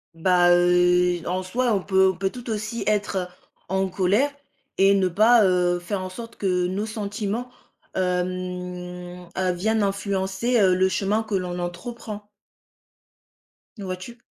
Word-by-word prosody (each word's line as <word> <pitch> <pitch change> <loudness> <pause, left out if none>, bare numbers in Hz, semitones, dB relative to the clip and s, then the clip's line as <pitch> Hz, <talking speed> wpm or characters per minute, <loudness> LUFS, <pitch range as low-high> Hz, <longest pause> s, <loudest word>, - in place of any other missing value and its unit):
Bah 175 +1 +4
heu 180 0 +4
et - - -10
en 185 +1 -1
soi, 240 +6 0
on 195 -3 0
peut 190 -1 +4
on - - -15
peut 190 0 -1
tout 245 -1 -9
aussi 215 +1 -3
être 200 -3 0 0.4
en 190 +1 +1
colère 200 +10 +2 0.5
et 195 +1 +6
ne 190 -1 +2
pas, 220 +6 +5
heu, 180 -1 +2
faire 185 +2 -3
en 185 - -5
sorte 230 +4 -9
que 180 -2 +1
nos 195 +4 -2
sentiments, 215 +2 -3 0.5
hem 180 -1 -3
heu, 185 -1 +1
viennent 220 +4 0
influencer, 200 +3 0
heu, 190 -3 +5
le 185 +1 +3
chemin 205 +3 0
que 215 -2 -3
l'on 180 -1 -2
entreprend. 205 +4 -6 1.5
Vois-tu? 190 +3 -6
190 Hz, 145 wpm, -24 LUFS, 180-210 Hz, 1.5 s, et